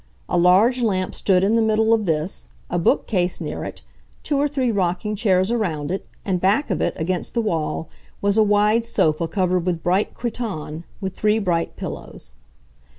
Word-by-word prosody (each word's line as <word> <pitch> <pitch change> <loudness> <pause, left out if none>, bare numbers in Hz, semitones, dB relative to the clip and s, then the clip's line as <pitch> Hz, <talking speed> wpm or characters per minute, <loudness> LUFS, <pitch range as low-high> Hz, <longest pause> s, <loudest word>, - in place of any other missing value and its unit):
A - - -1
large 190 +9 +4
lamp 190 -5 0
stood 185 -2 +2
in 210 +3 +3
the 230 - +3
middle 220 0 +3
of 215 -3 +1
this, 160 +3 -1 0.2
a 175 - +1
bookcase 180 +1 +1
near - - -4
it, - - -7 0.4
two 295 - -1
or 290 - +3
three 265 -4 0
rocking 190 +1 -1
chairs 195 -2 +2
around 170 -11 -1
it, 190 - -4 0.2
and 185 -3 0
back 205 +7 +2
of 185 - -1
it, - - 0
against 175 +6 -2
the - - +2
wall, 165 -5 -2 0.3
was 200 0 +1
a 220 - +5
wide 210 +2 +3
sofa 165 -7 +1
covered 180 0 0
with 175 -2 -2
bright 185 +4 +1
cretonne, 190 -10 -4 0.2
with 190 -2 -3
three 215 +1 +2
bright 175 -6 -1
pillows. - - -8
195 Hz, 180 wpm, -22 LUFS, 175-220 Hz, 0.4 s, a